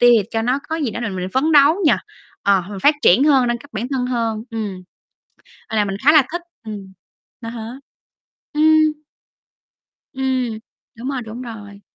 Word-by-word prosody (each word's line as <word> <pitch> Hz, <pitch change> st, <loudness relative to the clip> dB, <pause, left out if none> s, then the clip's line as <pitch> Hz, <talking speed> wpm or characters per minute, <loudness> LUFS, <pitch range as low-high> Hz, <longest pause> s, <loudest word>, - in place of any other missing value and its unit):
tiêu 245 Hz, 0 st, +7 dB, 0.2 s
cho 225 Hz, -1 st, -1 dB
nó 250 Hz, +3 st, +1 dB
có 320 Hz, -, -1 dB
gì 290 Hz, -7 st, -1 dB
đó 220 Hz, -, -5 dB
là 235 Hz, -, -2 dB
mình 185 Hz, -1 st, -4 dB
phấn 295 Hz, +5 st, +2 dB
đấu 290 Hz, +1 st, +7 dB
nhỉ. 305 Hz, -, +6 dB, 0.5 s
Ờ, 200 Hz, -2 st, +3 dB
mình 200 Hz, -, -6 dB
phát 295 Hz, -, +6 dB
triển 225 Hz, +11 st, +5 dB
hơn, 270 Hz, -4 st, +4 dB
nâng 240 Hz, 0 st, 0 dB
cấp 285 Hz, +4 st, -16 dB
bản 225 Hz, +3 st, -3 dB
thân 260 Hz, -2 st, -1 dB
hơn. 230 Hz, -3 st, -1 dB
Ừm. 210 Hz, -5 st, -4 dB, 0.9 s
À, 215 Hz, -2 st, +1 dB
mình 195 Hz, -1 st, -3 dB
khá 295 Hz, -, +7 dB
là 305 Hz, -2 st, +7 dB
thích, 345 Hz, 0 st, -3 dB, 0.2 s
ừm. 200 Hz, -3 st, -7 dB, 0.5 s
À 230 Hz, -1 st, -6 dB
há. 225 Hz, -1 st, -6 dB, 0.8 s
Ừm. 310 Hz, 0 st, +3 dB, 1.1 s
Ừm, 260 Hz, -2 st, -1 dB, 0.5 s
đúng 245 Hz, +3 st, -5 dB
rồi, 265 Hz, -3 st, -3 dB
đúng 225 Hz, +3 st, -7 dB
rồi, 205 Hz, -4 st, -9 dB
240 Hz, 180 wpm, -20 LUFS, 215-280 Hz, 1.1 s, tiêu